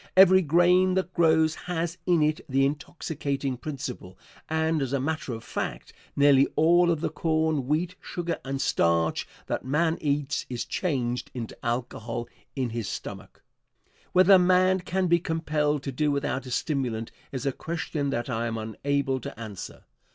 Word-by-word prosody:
Every 190 Hz, 0 st, +8 dB
grain 180 Hz, +3 st, +4 dB
that 185 Hz, -1 st, -1 dB
grows 160 Hz, -1 st, +4 dB
has 170 Hz, 0 st, -4 dB
in 170 Hz, -3 st, +4 dB
it 155 Hz, +1 st, +1 dB
the 135 Hz, +1 st, +3 dB
intoxicating 140 Hz, -2 st, -3 dB
principle, 125 Hz, -9 st, -6 dB, 0.3 s
and, 160 Hz, 0 st, +1 dB
as 135 Hz, -1 st, -2 dB
a 140 Hz, -, +2 dB
matter 150 Hz, 0 st, -2 dB
of 115 Hz, -1 st, -6 dB
fact, -, -, -5 dB, 0.2 s
nearly 140 Hz, -1 st, +5 dB
all 175 Hz, +3 st, +5 dB
of 165 Hz, -3 st, +1 dB
the -, -, 0 dB
corn, 160 Hz, -3 st, 0 dB
wheat, 165 Hz, +5 st, 0 dB
sugar 170 Hz, -1 st, -3 dB
and 135 Hz, 0 st, -3 dB
starch 85 Hz, -8 st, +1 dB, 0.2 s
that -, -, -3 dB
man 160 Hz, +5 st, +1 dB
eats 145 Hz, -1 st, -1 dB
is 125 Hz, -2 st, -3 dB
changed 125 Hz, -8 st, -2 dB
into 115 Hz, -3 st, -5 dB
alcohol 120 Hz, -1 st, -3 dB, 0.3 s
in 130 Hz, -4 st, -1 dB
his 115 Hz, -3 st, -3 dB
stomach. -, -, -8 dB, 0.7 s
Whether 185 Hz, +1 st, +7 dB
man 185 Hz, +1 st, +4 dB
can 185 Hz, +1 st, -1 dB
be 170 Hz, -1 st, +4 dB
compelled 150 Hz, -4 st, -1 dB
to 135 Hz, -, -3 dB
do 150 Hz, +4 st, 0 dB
without 140 Hz, -2 st, -1 dB
a -, -, -6 dB
stimulant 125 Hz, -5 st, -2 dB, 0.2 s
is 135 Hz, -1 st, -4 dB
a 140 Hz, -, +2 dB
question 155 Hz, -1 st, -3 dB
that 120 Hz, -3 st, -2 dB
I 115 Hz, -2 st, -1 dB
am 115 Hz, -1 st, -3 dB
unable 135 Hz, +5 st, -1 dB
to 115 Hz, -, -8 dB
answer. 105 Hz, -5 st, -8 dB
145 Hz, 160 wpm, -27 LUFS, 130-165 Hz, 0.7 s, Every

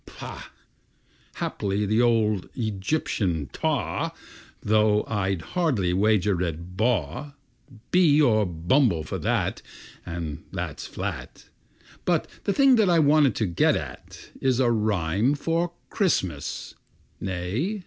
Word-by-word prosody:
Pah! -, -, -8 dB, 0.9 s
(Haply 100 Hz, +1 st, -2 dB
the 110 Hz, +3 st, +2 dB
old 110 Hz, -5 st, +2 dB
Egyptian 100 Hz, -, -1 dB
ptah -, -, -1 dB, 0.5 s
Though 105 Hz, 0 st, +3 dB
I'd 95 Hz, -5 st, -1 dB
hardly 125 Hz, -, +1 dB
wager 100 Hz, -2 st, +2 dB
a 85 Hz, -3 st, 0 dB
baw 90 Hz, -, -2 dB, 0.6 s
Bee 165 Hz, -5 st, +5 dB
or 115 Hz, -8 st, +4 dB
a -, -, +1 dB
bumble, 85 Hz, -, +2 dB
for 75 Hz, -, -5 dB
that -, -, -1 dB, 0.4 s
And 85 Hz, -4 st, -5 dB
that's -, -, -5 dB
flat!).... -, -, -6 dB, 0.5 s
But -, -, +1 dB, 0.2 s
the -, -, +2 dB
thing 270 Hz, 0 st, +5 dB
that 215 Hz, -4 st, +4 dB
I 170 Hz, -, +4 dB
want 150 Hz, -2 st, +4 dB
to 110 Hz, -, 0 dB
get 85 Hz, -3 st, +2 dB
at -, -, -8 dB
Is 130 Hz, -2 st, +2 dB
a 125 Hz, -2 st, +3 dB
rhyme 105 Hz, -, +1 dB
for 165 Hz, +3 st, -1 dB, 0.2 s
Christmas 95 Hz, -, -1 dB, 0.5 s
Nay! 100 Hz, -, -2 dB
110 Hz, 120 wpm, -25 LUFS, 90-145 Hz, 0.9 s, Bee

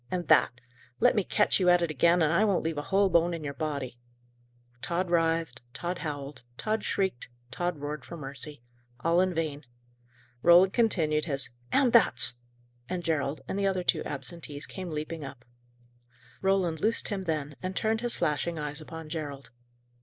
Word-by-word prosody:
and 180 Hz, -1 st, -3 dB
that! -, -, +6 dB, 0.5 s
Let -, -, +4 dB
me 205 Hz, -, +2 dB
catch 210 Hz, +3 st, +2 dB
you 180 Hz, -1 st, +4 dB
at 175 Hz, -1 st, +5 dB
it 165 Hz, -, 0 dB
again, 170 Hz, +4 st, +4 dB
and 155 Hz, +1 st, +2 dB
I 180 Hz, +5 st, +4 dB
won't 200 Hz, -4 st, +2 dB
leave 160 Hz, -2 st, -2 dB
a 145 Hz, -, -7 dB
whole 195 Hz, +1 st, +4 dB
bone 170 Hz, -1 st, +3 dB
in 160 Hz, -, -7 dB
your 140 Hz, -1 st, -4 dB
body!" 140 Hz, -6 st, -4 dB, 0.8 s
Tod 175 Hz, +1 st, -1 dB
writhed; 165 Hz, -5 st, +1 dB
Tod 175 Hz, +1 st, -3 dB
howled; 145 Hz, -3 st, -5 dB, 0.2 s
Tod 215 Hz, 0 st, -1 dB
shrieked; 190 Hz, -11 st, -1 dB, 0.2 s
Tod 175 Hz, +4 st, -2 dB
roared 145 Hz, +1 st, -5 dB
for 170 Hz, -, -8 dB
mercy. 140 Hz, -1 st, -8 dB, 0.4 s
All 170 Hz, +4 st, +3 dB
in 185 Hz, 0 st, +2 dB
vain. 155 Hz, -3 st, -2 dB, 0.8 s
Roland 175 Hz, +4 st, +6 dB
continued 160 Hz, -10 st, +2 dB
his 140 Hz, -5 st, 0 dB, 0.2 s
"and 260 Hz, -4 st, +3 dB
thats!" 235 Hz, -, +4 dB, 0.6 s
and 180 Hz, -1 st, -3 dB
Gerald 145 Hz, -3 st, -1 dB
and 195 Hz, -, -2 dB
the 200 Hz, -, +2 dB
other 185 Hz, -2 st, 0 dB
two 165 Hz, -3 st, +2 dB
absentees 145 Hz, +2 st, -4 dB
came 185 Hz, -2 st, -7 dB
leaping 155 Hz, 0 st, -4 dB
up. 135 Hz, -3 st, -9 dB, 1.0 s
Roland 190 Hz, -4 st, +1 dB
loosed 225 Hz, +2 st, +1 dB
him 195 Hz, -3 st, -3 dB
then, 150 Hz, -3 st, -2 dB
and 185 Hz, 0 st, -4 dB
turned 220 Hz, 0 st, 0 dB
his 240 Hz, -1 st, +1 dB
flashing 165 Hz, +1 st, 0 dB
eyes 150 Hz, 0 st, -4 dB
upon 160 Hz, 0 st, -8 dB
Gerald. 145 Hz, -5 st, -6 dB
165 Hz, 175 wpm, -29 LUFS, 150-185 Hz, 1.0 s, that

